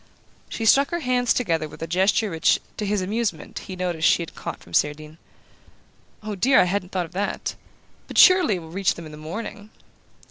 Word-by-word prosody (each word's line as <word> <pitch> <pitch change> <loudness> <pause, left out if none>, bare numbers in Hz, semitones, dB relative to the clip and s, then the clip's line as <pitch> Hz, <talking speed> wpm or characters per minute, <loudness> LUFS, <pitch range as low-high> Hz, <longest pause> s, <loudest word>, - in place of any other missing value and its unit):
She 225 - -4
struck 275 +5 +5
her 345 0 -3
hands 250 -2 +1
together 165 -10 0
with 160 - -9
a - - -1
gesture 190 +5 +1
which, 160 -1 +2 0.2
to 210 - -3
his 200 -2 0
amusement, 205 -4 -3
he 185 - -8
noticed 175 -3 0
she 170 - +3
had 165 - -10
caught - - -7
from 85 - -17
Cerdine. 150 - -1 1.0
"Oh, 215 0 -4
dear, 255 +8 +4
I - - +6
hadn't 180 0 -2
thought 180 -2 -1
of 165 - -15
that! 195 +3 -3 0.5
But - - -7
surely 365 - +7
it - - -4
will 160 - -12
reach 195 +1 0
them 170 - -9
in 155 - -10
the 150 - -10
morning?" 205 +6 -7
190 Hz, 205 wpm, -23 LUFS, 165-220 Hz, 1.0 s, surely